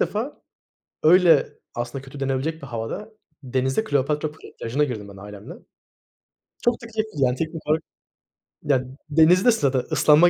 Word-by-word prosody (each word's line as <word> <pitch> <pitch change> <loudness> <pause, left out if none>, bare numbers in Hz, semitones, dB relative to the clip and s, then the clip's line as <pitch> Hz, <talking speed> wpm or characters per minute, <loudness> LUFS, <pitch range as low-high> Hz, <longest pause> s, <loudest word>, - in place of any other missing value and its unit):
defa - - -2 0.6
öyle 170 -1 +6 0.2
aslında 120 +3 -4
kötü 135 +1 -11
denebilecek 135 +4 -1
bir 140 - -8
havada, 120 - -5 0.3
denizde 130 - 0
Kleopatra 150 -2 0 0.3
Plajı'na 125 +6 0
girdim 115 -8 -3
ben 100 - -12
ailemle. 100 +1 -9 1.1
Çok 240 - +4
da - - -7
keyifli, 220 -1 -3
yani, 125 0 +2
teknik 160 +2 -3
olarak, 155 +1 +2 0.8
ya 130 -3 +2 0.2
denizi 160 +5 +5
de - - +7
ısladı, 140 - +2
ıslanma 155 +3 +6
145 Hz, 140 wpm, -24 LUFS, 130-160 Hz, 1.1 s, de